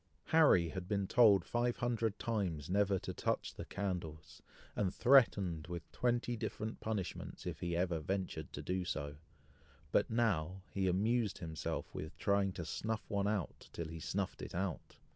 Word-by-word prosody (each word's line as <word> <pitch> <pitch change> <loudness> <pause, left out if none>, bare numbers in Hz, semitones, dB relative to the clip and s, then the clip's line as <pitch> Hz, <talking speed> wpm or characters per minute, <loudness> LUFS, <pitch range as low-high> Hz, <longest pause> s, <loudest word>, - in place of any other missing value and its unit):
Harry 140 - +6
had 90 +2 -5
been 100 0 0
told 105 -2 +6
five 120 0 0
hundred 115 -3 0
times, 90 -9 -2
never 100 0 +3
to 95 -1 -5
touch - - -1
the - - -7
candles, 85 -6 -4 0.3
and 95 -3 +1
threatened 100 - +4
with 85 0 -6
twenty 120 0 0
different 110 0 -4
punishments, 105 -5 -4
if - - -4
he 85 -1 -1
ever 90 -2 +1
ventured 90 -2 -3
to - - -6
do 90 0 -1
so; 70 -3 -3 0.7
but - - +3
now, 95 -6 +1
he 95 -1 0
amused 105 +4 +2
himself 80 -4 -4
with 75 - -6
trying 100 -1 +2
to 85 -2 -5
snuff 110 +8 -2
one 100 -3 +1 0.3
till 85 -2 -4
he 80 0 -6
snuffed 95 +4 -2
it - - -6
out. 95 -1 -3
95 Hz, 160 wpm, -36 LUFS, 85-110 Hz, 0.7 s, Harry